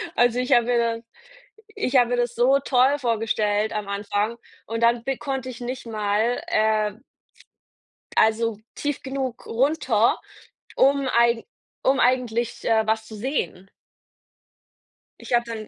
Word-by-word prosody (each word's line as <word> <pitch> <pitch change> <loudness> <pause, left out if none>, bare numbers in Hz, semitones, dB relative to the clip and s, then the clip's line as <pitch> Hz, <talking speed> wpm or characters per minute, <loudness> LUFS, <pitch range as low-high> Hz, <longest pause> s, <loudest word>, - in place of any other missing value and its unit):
Also, 245 0 +3
ich 250 - -2
habe 240 -1 +5
mir 245 0 +1
dann 230 0 -1 0.7
ich 275 -10 -1
habe 245 -1 +4
mir 245 - +1
das 240 -1 -1
so 260 +4 +4
toll 270 +1 +3
vorgestellt 215 -3 0
am 210 -2 -3
Anfang 205 +3 -2 0.3
und 230 0 -3
dann 235 0 +3
b 270 +1 -2
konnte 265 -2 -4
ich 245 - -9
nicht 245 0 -5
mal, 215 +2 0
äh 215 -1 +1 1.2
also 220 -1 +2 0.2
tief 290 -1 -3
genug 265 -2 -4
runter, 245 -3 +2 0.6
um 275 0 +3
eigen 235 -1 +3 0.4
um 270 +1 +3
eigentlich, 240 -2 0
äh, 220 -1 +3
was 220 0 0
zu 220 - -10
sehen. 210 -5 -3 1.5
Ich - - -6
habe 240 0 +4
dann 220 -2 -6
235 Hz, 140 wpm, -24 LUFS, 220-255 Hz, 1.5 s, habe